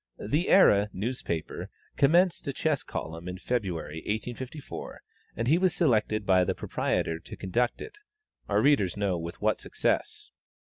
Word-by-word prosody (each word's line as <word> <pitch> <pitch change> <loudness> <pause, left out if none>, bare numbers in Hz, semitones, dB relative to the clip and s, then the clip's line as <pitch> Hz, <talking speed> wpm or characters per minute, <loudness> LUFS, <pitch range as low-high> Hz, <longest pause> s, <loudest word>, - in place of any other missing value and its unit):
"The 150 - -1
Era" 105 - +6
newspaper 95 -6 -4 0.3
commenced 170 +3 +3
a 140 - -1
chess 150 0 0
column 85 +2 -6
in 90 0 -5
February, 90 -9 -3
1854, 120 - -5 0.3
and 115 - -2
he 160 +6 +4
was 185 -2 +2
selected 110 - +2
by 95 -1 +4
the - - -1
proprietor 80 0 -1
to - - -10
conduct 120 +6 -1
it 425 -1 -12 0.5
our 105 +1 +2
readers 130 -11 +3
know 100 -4 0
with 85 +1 -7
what - - +2
success. - - -2
110 Hz, 145 wpm, -28 LUFS, 90-145 Hz, 0.5 s, Era